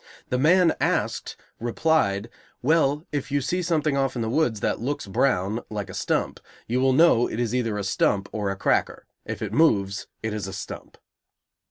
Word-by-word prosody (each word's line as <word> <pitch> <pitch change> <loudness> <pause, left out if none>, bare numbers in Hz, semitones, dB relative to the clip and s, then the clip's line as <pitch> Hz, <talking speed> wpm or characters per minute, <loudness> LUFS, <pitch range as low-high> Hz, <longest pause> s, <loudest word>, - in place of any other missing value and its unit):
The 125 - 0
man 165 +3 +5
asked - - -1 0.2
replied, 115 -4 +1 0.3
"Well, 150 +1 +2
if 145 -2 -3
you 145 - +2
see 180 +7 -1
something 155 -4 +1
off 135 -1 0
in 120 - -1
the 110 - -2
woods 125 -7 +1
that - - 0
looks 140 +4 -2
brown, 100 0 +1
like 105 -3 -5
a - - -10
stump, - - -1 0.3
you 125 +3 0
will 135 0 +4
know 135 -5 +5
it 110 - -4
is 120 -1 -1
either 115 -4 0
a 100 - -2
stump 100 +1 +1
or 105 -2 -2
a 100 - -2
cracker; 95 - 0 0.2
if - - -4
it - - -4
moves, 100 -11 +2 0.2
it 110 -1 -2
is 105 -2 -4
a 95 - -6
stump." - - -8
120 Hz, 190 wpm, -25 LUFS, 105-150 Hz, 0.3 s, man